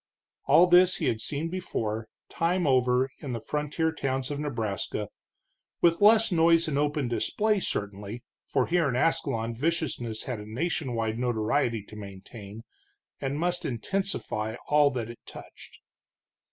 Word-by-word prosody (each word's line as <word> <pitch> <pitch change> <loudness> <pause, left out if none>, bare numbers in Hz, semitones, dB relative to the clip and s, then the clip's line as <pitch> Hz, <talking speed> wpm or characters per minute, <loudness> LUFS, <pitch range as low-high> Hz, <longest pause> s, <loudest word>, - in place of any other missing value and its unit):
All 175 - +7
this 180 +1 +6
he - - -2
had 110 -1 0
seen 150 +6 -2
before, 110 -12 -3 0.2
time 175 +1 0
over, 130 -1 +3
in 135 -4 -5
the 115 - -3
frontier 150 +6 -1
towns 135 -3 -2
of 145 - -3
Nebraska, 110 -7 -3 0.7
with 170 +1 +3
less 220 +1 +6
noise 165 0 +4
and 150 - -1
open 145 -2 0
display, 210 - +1
certainly, 105 - -4 0.2
for - - +1
here 170 -4 +2
in 125 - -1
Ascalon 120 -5 0
viciousness 125 -5 -2
had 125 -4 -4
a 105 +1 -9
nation 135 -1 -2
wide 110 0 -1
notoriety 115 -1 0
to 105 - -13
maintain, 100 +1 -10 0.6
and 140 +1 -2
must 175 +1 0
intensify 120 - -2
all 150 0 +5
that 120 -4 -3
it 120 - -13
touched. - - -12
135 Hz, 145 wpm, -28 LUFS, 115-165 Hz, 0.7 s, All